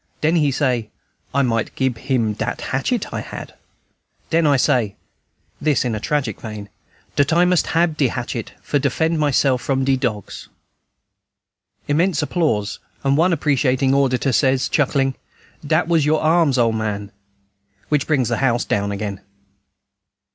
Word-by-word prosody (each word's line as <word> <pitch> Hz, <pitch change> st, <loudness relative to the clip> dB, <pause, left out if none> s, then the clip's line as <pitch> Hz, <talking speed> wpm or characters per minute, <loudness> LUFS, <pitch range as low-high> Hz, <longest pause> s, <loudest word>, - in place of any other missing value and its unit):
"Den 160 Hz, +3 st, +2 dB
he 150 Hz, -3 st, +3 dB
say 125 Hz, -5 st, 0 dB, 0.4 s
I 140 Hz, +1 st, +2 dB
might 115 Hz, -3 st, -1 dB
gib 130 Hz, -3 st, -1 dB
him 120 Hz, -5 st, 0 dB
dat 110 Hz, +3 st, -4 dB
hatchet 145 Hz, -, -2 dB
I -, -, -2 dB
had. -, -, -8 dB, 0.8 s
"Den 165 Hz, -1 st, +3 dB
I 140 Hz, -2 st, +4 dB
say" 115 Hz, -5 st, +1 dB, 0.7 s
(this 145 Hz, -3 st, +1 dB
in 120 Hz, -, -1 dB
a 110 Hz, -, -2 dB
tragic 130 Hz, -3 st, -2 dB
vein) 105 Hz, -2 st, -7 dB, 0.5 s
"dat 140 Hz, +1 st, +2 dB
I 170 Hz, +2 st, +4 dB
must 180 Hz, -1 st, +2 dB
hab 165 Hz, -1 st, +1 dB
dat 135 Hz, -4 st, +2 dB
hatchet 120 Hz, -1 st, -5 dB
for 145 Hz, -, 0 dB
defend 160 Hz, +4 st, 0 dB
myself 135 Hz, -3 st, +2 dB
from 135 Hz, -1 st, 0 dB
de 135 Hz, 0 st, +3 dB
dogs!" 115 Hz, -7 st, -4 dB, 1.4 s
[Immense 165 Hz, +3 st, +1 dB
applause, 140 Hz, -, -1 dB, 0.2 s
and 135 Hz, 0 st, +2 dB
one 170 Hz, +5 st, +3 dB
appreciating 135 Hz, -4 st, +1 dB
auditor 135 Hz, -1 st, +2 dB
says, 130 Hz, -1 st, +2 dB
chuckling, 135 Hz, -2 st, +1 dB, 0.5 s
"Dat 155 Hz, +3 st, +1 dB
was 165 Hz, -3 st, +3 dB
your 155 Hz, +1 st, +2 dB
arms, 160 Hz, -4 st, +3 dB
ole 115 Hz, -2 st, +3 dB
man," 105 Hz, -2 st, -3 dB, 0.8 s
which 150 Hz, -2 st, +1 dB
brings 135 Hz, -6 st, +1 dB
down 120 Hz, -, 0 dB
the -, -, -2 dB
house 120 Hz, -2 st, +2 dB
again. 100 Hz, -1 st, -2 dB
135 Hz, 150 wpm, -20 LUFS, 120-150 Hz, 1.4 s, I